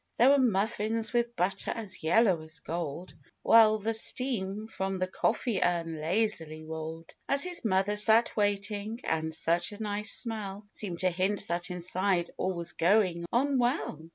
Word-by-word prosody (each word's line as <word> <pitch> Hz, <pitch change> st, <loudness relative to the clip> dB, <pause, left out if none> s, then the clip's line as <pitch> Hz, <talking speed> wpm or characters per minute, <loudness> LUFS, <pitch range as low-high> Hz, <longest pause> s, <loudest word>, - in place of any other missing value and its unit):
There 245 Hz, +3 st, +6 dB
were 285 Hz, -, +4 dB
muffins, 220 Hz, -1 st, 0 dB
with 240 Hz, 0 st, 0 dB
butter 190 Hz, +1 st, -1 dB
as 210 Hz, -5 st, -5 dB
yellow 185 Hz, +1 st, +3 dB
as 155 Hz, 0 st, -8 dB
gold, 165 Hz, +1 st, -5 dB, 0.3 s
"While 220 Hz, -1 st, +6 dB
the 220 Hz, +2 st, -2 dB
steam 220 Hz, -3 st, 0 dB
from 195 Hz, -3 st, -3 dB
the 185 Hz, -, 0 dB
coffee 195 Hz, +3 st, -1 dB
urn 165 Hz, -3 st, -1 dB
lazily 165 Hz, -3 st, -1 dB
rolled, 160 Hz, +1 st, -7 dB, 0.2 s
As 280 Hz, 0 st, +7 dB
his 360 Hz, -1 st, -4 dB
Mother 200 Hz, -1 st, +1 dB
sat 220 Hz, +3 st, +4 dB
waiting; 205 Hz, +2 st, -1 dB
and 160 Hz, 0 st, -1 dB
such 170 Hz, +3 st, 0 dB
a 205 Hz, -, -10 dB
nice 210 Hz, +1 st, -1 dB
smell 210 Hz, -3 st, -4 dB
Seemed 180 Hz, -5 st, -5 dB
to 185 Hz, -1 st, +2 dB
hint 190 Hz, +3 st, -1 dB
that 175 Hz, +1 st, -2 dB
inside 180 Hz, 0 st, -1 dB
all 185 Hz, +1 st, -1 dB
was 170 Hz, -1 st, -4 dB
going 175 Hz, -2 st, +2 dB
on 270 Hz, +2 st, +1 dB
well 240 Hz, -, -2 dB
195 Hz, 160 wpm, -29 LUFS, 170-220 Hz, 0.3 s, As